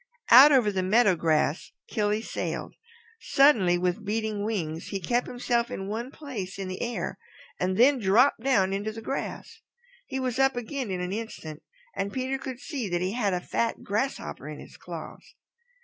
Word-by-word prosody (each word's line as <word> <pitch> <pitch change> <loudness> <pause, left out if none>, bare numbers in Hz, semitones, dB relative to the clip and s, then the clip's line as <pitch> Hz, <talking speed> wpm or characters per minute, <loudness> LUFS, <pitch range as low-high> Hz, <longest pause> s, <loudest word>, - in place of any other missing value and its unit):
Out 270 +5 +10
over 245 -7 +4
the 190 -2 -1
meadow 205 +1 +4
grass 160 -1 0
Killy 210 0 0
sailed. - - -4 0.5
Suddenly, 220 -11 +4
with 180 +4 -1
beating 215 0 -2
wings, 170 -7 -3
he 195 - -3
kept 240 +6 0
himself 240 -1 -1
in 195 -6 -5
one 225 +5 -4
place 235 -12 -7
in 195 -1 -4
the 185 0 -5
air 195 -5 -3 0.4
and 185 +1 0
then 265 +3 +5
dropped 230 +7 +4
down 200 -8 +2
into 205 +2 -2
the 225 +1 -9
grass. 270 - -5 0.5
He 265 - -3
was 255 -1 -2
up 270 -1 +4
again 245 0 -4
in 185 -1 -2
an 180 +1 -3
instant, 185 -8 -6 0.3
and 200 +1 -2
Peter 260 +3 -2
could 260 -2 -6
see 265 -7 -4
that 175 0 -1
he 185 +1 0
had 205 -6 0
a - - -1
fat 230 +5 -2
grasshopper 220 +7 -3
in - - -8
his - - -12
claws. - - -10
215 Hz, 180 wpm, -27 LUFS, 190-250 Hz, 0.5 s, Out